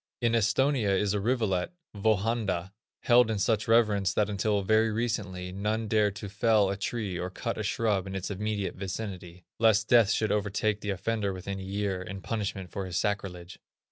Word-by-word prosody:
In 120 -2 +1
Esthonia 115 -1 +2
is 105 -1 +1
a 105 - 0
rivulet, 110 - 0 0.2
Vöhanda, 100 -3 0 0.3
held 120 -1 +5
in 110 - 0
such 105 +2 +1
reverence 105 -5 +3
that 105 0 +1
until 100 0 0
very 110 +2 +3
recently, 105 -5 -2
none 105 +4 -2
dared 105 -2 +2
to 100 +1 -6
fell 100 0 +2
a - - -2
tree 100 -3 -3
or 90 - -3
cut 115 +5 -4
a - - -1
shrub 105 -2 0
in 95 - -5
its 95 +1 -4
immediate 105 0 -2
vicinity, 95 -3 -6
lest 110 -1 +3
death 115 -4 +6
should 110 -1 +1
overtake 105 0 0
the 105 - -4
offender 100 +1 -1
within 95 +1 -5
a - - -6
year, 95 -1 -2
in 95 +1 -6
punishment 100 -5 -4
for 95 -1 -4
his 90 -1 -3
sacrilege. 95 -3 -3
105 Hz, 180 wpm, -28 LUFS, 95-110 Hz, 0.3 s, death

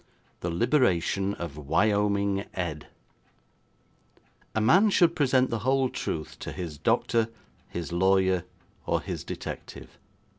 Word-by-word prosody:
The 85 - -3
Liberation 100 - +1
of 85 -4 -6
Wyoming 100 +5 +1
Ed 85 -5 -4 1.7
A - - +2
man 180 - +5
should 175 -4 +4
present 130 -3 +2
the 115 - -1
whole 130 +2 +2
truth 75 -9 -4
to - - -6
his 85 -5 -6
doctor, 115 -1 +1 0.4
his 85 0 -5
lawyer, 95 0 +3 0.4
or - - +2
his - - -5
detective. - - -8
100 Hz, 115 wpm, -27 LUFS, 85-125 Hz, 1.7 s, man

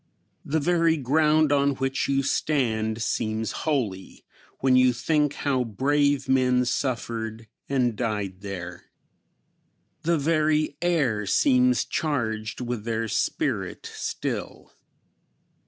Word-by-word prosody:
The 160 +3 0
very 165 0 +2
ground 150 +2 +3
on 140 -1 +2
which 135 +1 -1
you 135 0 +2
stand 115 -6 0
seems 110 0 -1
holy, 115 -12 -3 0.3
when 130 -1 +3
you 130 -1 +5
think 150 +3 +1
how 135 -3 0
brave 140 +5 +1
men 125 -1 +3
suffered 115 -3 -3 0.2
and 125 -4 +1
died 105 -5 -3
there. 100 -4 -7 1.2
The 170 0 +1
very 155 0 +1
air 135 - +1
seems 255 -2 +3
charged 110 -8 -2
with 120 -3 -3
their 115 0 -2
spirit - - -2
still. - - -5
130 Hz, 105 wpm, -25 LUFS, 110-150 Hz, 1.2 s, you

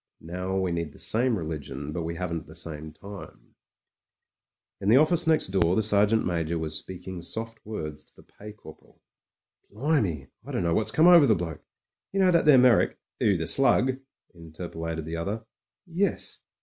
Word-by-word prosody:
Now 90 +3 -4
we 95 -2 0
need 85 -3 -3
the - - -16
same 120 0 +2
religion, 75 -4 -6
but 85 - -4
we 85 +1 -4
haven't 85 -3 -4
the 80 - -12
same 80 -2 -5
time. 100 +6 -12
• 100 - -8
•••••• - - -23 1.5
In 100 - -1
the 115 - +7
office 160 +3 +3
next 160 -10 +3
door 90 -2 +2
the 110 - +2
Sergeant 105 +1 +3
Ma 85 -2 -1
j 80 +1 -3
or - - -1
was 80 -1 -2
speaking 90 +3 -6
soft 115 +6 -5
words 75 -8 -6
to - - -19
the - - -18
Pay 105 +1 -12
Corporal. 80 -7 -16 0.7
"Blimey, 105 - -1
I - - -9
dunno 85 -1 0
what's 110 - +2
come 160 - +3
over 175 -5 +8
the 110 - +4
bloke. 85 -3 -5 0.5
You 195 - 0
know 185 -1 +5
that 170 -2 +3
there 150 -3 +7
Me)rrick.. 125 -3 +4
." - - -59
"Who, 100 -3 +2
the 80 - -3
Slug?" 130 +3 +3 0.3
interpolated 80 -1 -7
the 80 +1 -5
other. 105 +7 -4 0.4
"Yes. 180 +3 -2
95 Hz, 190 wpm, -26 LUFS, 80-115 Hz, 1.5 s, over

